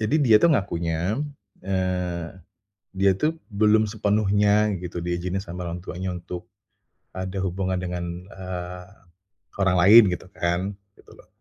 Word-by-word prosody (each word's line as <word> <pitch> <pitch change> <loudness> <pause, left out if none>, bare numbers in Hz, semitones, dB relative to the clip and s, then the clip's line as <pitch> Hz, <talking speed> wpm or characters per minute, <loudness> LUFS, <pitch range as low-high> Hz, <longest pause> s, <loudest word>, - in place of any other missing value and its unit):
Jadi 110 +8 +1
dia 115 -6 +6
tuh 170 - +6
ngakunya, 90 - 0 0.4
eee, 90 -3 -2 0.6
dia 95 0 +3
tuh 160 - -1
belum 110 0 +3
sepenuhnya 105 0 +2
gitu 85 0 -5
di 85 +1 -2
izinin 90 +2 -2
sama 90 -1 -7
orang 85 +1 -4
tuanya 90 +1 -5
untuk 90 0 -7 0.7
ada 95 +1 -5
hubungan 95 0 -1
dengan, 90 -1 -5
eee, 90 -2 -7 0.8
orang 95 -2 +3
lain 105 +6 +9
gitu 90 -1 -4
kan, 85 +3 -1 0.2
gitu - - -19
loh. - - -18
95 Hz, 135 wpm, -24 LUFS, 90-105 Hz, 0.8 s, lain